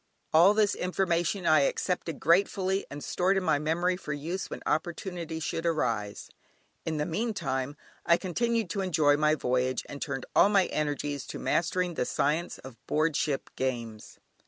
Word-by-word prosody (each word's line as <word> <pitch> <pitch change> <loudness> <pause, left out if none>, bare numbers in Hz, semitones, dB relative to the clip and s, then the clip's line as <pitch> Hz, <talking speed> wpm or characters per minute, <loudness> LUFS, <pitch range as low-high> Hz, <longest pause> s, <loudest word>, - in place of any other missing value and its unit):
All 175 +6 +7
this 210 -2 +3
information 180 0 0
I 155 -1 +6
accepted 165 +2 -1
gratefully 190 +3 +2
and 145 0 -7
stored 190 +2 +1
in 190 - 0
my 155 -4 +2
memory 170 +4 +1
for 155 -4 -5
use 165 +7 -4
when - - -7
opportunity 170 +1 -2
should 165 +1 -3
arise. 115 -11 -1 0.6
In 160 -1 -1
the 150 - 0
meantime 155 - -2 0.3
I 170 - +4
continued 225 +2 -1
to 200 - -1
enjoy 155 -6 +3
my 150 +1 +3
voyage, 130 -2 0
and 140 - -8
turned 135 -4 -3
all - - +6
my 195 -3 +4
energies 145 -2 -2
to - - -6
mastering 175 +1 0
the 125 - -1
science 155 +7 0
of 125 -4 -13
board 155 0 +1
ship 140 -2 -1
games. 115 -4 -4
160 Hz, 160 wpm, -28 LUFS, 145-180 Hz, 0.6 s, All